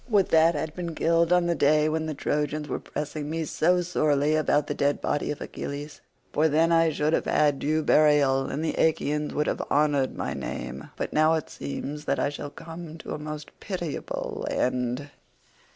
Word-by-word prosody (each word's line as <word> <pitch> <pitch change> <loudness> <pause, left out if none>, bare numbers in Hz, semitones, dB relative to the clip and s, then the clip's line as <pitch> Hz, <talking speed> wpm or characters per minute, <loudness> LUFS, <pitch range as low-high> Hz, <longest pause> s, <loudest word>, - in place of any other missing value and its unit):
Would 205 -4 +3
that 165 +1 +5
I 145 - -1
had 155 -1 -4
been 170 -2 -5
killed 165 +1 +2
on 180 -1 +4
the 170 - +2
day 150 0 +3
when 160 0 -1
the 155 - -3
Trojans 150 +1 -1
were - - -3
pressing 150 0 -5
me 160 0 -2
so 180 +4 +2
sorely 150 -4 +1
about 150 -1 +2
the 145 - -2
dead 145 0 +1
body 145 - -1
of 150 - -4
Achilles, 145 +1 -6 0.3
for 155 +2 +3
then 160 +3 +3
I 165 -1 +4
should 150 0 0
have - - +1
had 145 -2 +2
due 155 +2 0
burial 145 -4 +4
and 155 +3 -3
the - - 0
Achaeans 150 -1 +1
would 150 - +1
have - - -1
honoured 145 -2 +2
my - - -2
name; 65 +2 -6
but - - -4
now 155 +1 +4
it 160 - -4
seems 150 +1 -5
that - - +1
I - - +1
shall 145 0 -6
come 165 +1 -9
to - - -7
a - - -5
most 150 0 -7
pitiable 175 -6 -4
end." 125 +3 -1
150 Hz, 200 wpm, -26 LUFS, 145-160 Hz, 0.3 s, that